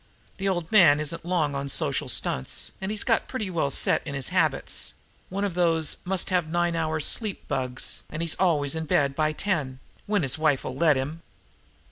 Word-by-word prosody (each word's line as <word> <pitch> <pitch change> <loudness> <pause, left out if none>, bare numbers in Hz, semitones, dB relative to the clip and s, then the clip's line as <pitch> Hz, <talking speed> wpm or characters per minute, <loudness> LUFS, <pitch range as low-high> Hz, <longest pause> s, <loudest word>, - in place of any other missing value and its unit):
The 195 0 -1
old 175 -3 -2
man 170 -9 +6
isn't 155 +2 -3
long 165 -5 0
on 140 0 -3
social - - +1
stunts, 65 - 0
and 190 - -3
he's 215 0 -2
got 225 - +1
pretty 215 -8 -4
well 160 -5 0
set - - +2
in 140 - -6
his 130 -8 -3
habits; - - 0 0.3
one 195 +2 -3
of 200 -3 -1
those 165 -3 +2
must 190 0 -1
have 180 -3 +1
nine 175 +1 0
hours' 155 -2 0
sleep 215 -4 -1
bugs, 130 -3 -3
and 155 +2 -4
he's 165 - +2
always 150 -7 +2
in 160 0 -3
bed 140 -2 +2
by 155 +1 +1
ten 150 -7 -2 0.3
when 205 -4 +1
his 135 +3 0
wife'll 145 -4 +1
let 155 0 +4
him. 145 +5 -4
160 Hz, 190 wpm, -26 LUFS, 145-185 Hz, 0.3 s, man